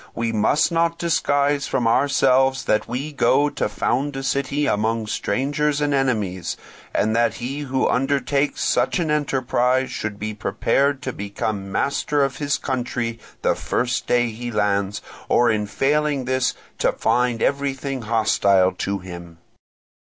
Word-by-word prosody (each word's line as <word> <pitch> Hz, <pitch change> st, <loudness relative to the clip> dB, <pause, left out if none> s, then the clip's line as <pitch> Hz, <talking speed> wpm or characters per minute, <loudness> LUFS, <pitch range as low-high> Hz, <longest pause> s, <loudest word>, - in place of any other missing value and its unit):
We 115 Hz, 0 st, -1 dB
must 110 Hz, +9 st, +2 dB
not 170 Hz, 0 st, +1 dB
disguise 145 Hz, -4 st, +1 dB
from 120 Hz, -, 0 dB
ourselves 135 Hz, +1 st, +3 dB
that 110 Hz, -, +1 dB
we 130 Hz, +6 st, -4 dB
go 145 Hz, 0 st, +2 dB
to -, -, -2 dB
found 135 Hz, +7 st, -1 dB
a 135 Hz, -, -4 dB
city 140 Hz, +2 st, 0 dB
among 110 Hz, 0 st, 0 dB
strangers 140 Hz, +7 st, -1 dB
and 145 Hz, -1 st, 0 dB
enemies, 105 Hz, -10 st, -1 dB, 0.3 s
and 110 Hz, +2 st, +1 dB
that 115 Hz, -1 st, +2 dB
he 130 Hz, +4 st, -4 dB
who 135 Hz, -2 st, 0 dB
undertakes 140 Hz, +2 st, 0 dB
such -, -, +1 dB
an 165 Hz, -4 st, 0 dB
enterprise 130 Hz, -3 st, +1 dB
should 105 Hz, -1 st, -4 dB
be 110 Hz, +1 st, -4 dB
prepared 125 Hz, +7 st, 0 dB
to 130 Hz, -, -3 dB
become 100 Hz, 0 st, -4 dB
master 140 Hz, +5 st, 0 dB
of 135 Hz, -1 st, -2 dB
the 145 Hz, -1 st, 0 dB
country 120 Hz, -3 st, -2 dB, 0.2 s
the -, -, +3 dB
first 120 Hz, 0 st, -2 dB
day 120 Hz, -1 st, +2 dB
he 120 Hz, +2 st, -6 dB
lands, 105 Hz, -1 st, 0 dB, 0.3 s
or 120 Hz, -2 st, +4 dB
failing 145 Hz, +5 st, +1 dB
in -, -, -7 dB
this 130 Hz, 0 st, 0 dB, 0.2 s
to -, -, +2 dB
find 125 Hz, -2 st, +1 dB
everything 140 Hz, -1 st, -1 dB
hostile 100 Hz, -4 st, +3 dB
to 100 Hz, 0 st, -3 dB
him. 85 Hz, -2 st, -10 dB
130 Hz, 145 wpm, -22 LUFS, 110-140 Hz, 0.3 s, or